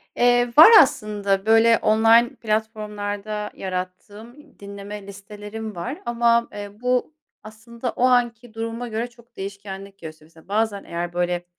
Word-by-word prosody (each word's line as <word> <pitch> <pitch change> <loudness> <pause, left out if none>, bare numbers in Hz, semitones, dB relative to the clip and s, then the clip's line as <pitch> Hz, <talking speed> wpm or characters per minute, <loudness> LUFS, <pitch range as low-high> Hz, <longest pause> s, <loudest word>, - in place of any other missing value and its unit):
Eee, 245 0 +2
var 325 +9 +10
aslında, 210 -7 -1
böyle 225 +1 +5
online 225 +4 +3
platformlarda 210 -2 -4
yarattığım 205 +9 -8
dinleme 200 0 -9
listelerim 210 +2 -9
var, 255 - -6
ama, 235 0 +2
eee, 205 -1 -7
bu, 250 +4 0 0.3
aslında 230 +3 -7
o - - -3
anki 240 -2 +1
duruma 230 +2 -5
göre 230 +1 -3
çok 235 0 -23
değişkenlik 195 0 -8
gösteriyor, 155 -1 -11
mesela, 160 - -19
bazen, 210 0 -1
eğer, 175 0 -5
böyle, 175 0 -2
215 Hz, 130 wpm, -22 LUFS, 200-235 Hz, 0.3 s, var